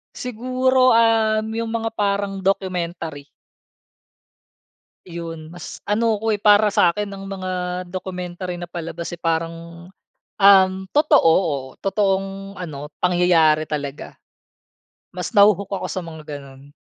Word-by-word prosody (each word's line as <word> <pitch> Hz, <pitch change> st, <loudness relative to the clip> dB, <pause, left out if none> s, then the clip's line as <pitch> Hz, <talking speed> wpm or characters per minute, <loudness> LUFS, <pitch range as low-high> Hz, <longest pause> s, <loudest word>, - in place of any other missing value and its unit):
Siguro, 255 Hz, +1 st, +2 dB
um, 220 Hz, -1 st, +3 dB
yung 230 Hz, +1 st, -3 dB
mga 225 Hz, 0 st, -1 dB
parang 200 Hz, -2 st, -1 dB
documentary. 175 Hz, -6 st, -2 dB, 1.8 s
Iyon, 165 Hz, -2 st, -8 dB
mas 175 Hz, -2 st, -8 dB
ano 220 Hz, +1 st, +1 dB
ko 220 Hz, +1 st, 0 dB
eh, 205 Hz, -, -3 dB
para 210 Hz, 0 st, +5 dB
sa -, -, +5 dB
akin 205 Hz, +4 st, -3 dB
ang 195 Hz, 0 st, -8 dB
mga 185 Hz, -2 st, -3 dB
documentary 180 Hz, -1 st, -5 dB
na 175 Hz, -, -6 dB
palabas 170 Hz, 0 st, -6 dB
eh, 175 Hz, -, -8 dB
parang, 165 Hz, +1 st, -3 dB, 0.5 s
um, 195 Hz, -1 st, +6 dB, 0.2 s
totoo, 290 Hz, -, +5 dB, 0.5 s
totoong 195 Hz, -1 st, -1 dB
ano, 150 Hz, -5 st, -7 dB
pangyayari 175 Hz, -4 st, +3 dB
talaga. 145 Hz, -2 st, -6 dB, 0.9 s
Mas -, -, -5 dB
naho-hook 200 Hz, -1 st, +4 dB
ako 195 Hz, -, -3 dB
sa -, -, -3 dB
mga 160 Hz, -1 st, -9 dB, 0.2 s
ganun. 140 Hz, 0 st, -14 dB
185 Hz, 115 wpm, -21 LUFS, 170-210 Hz, 1.8 s, um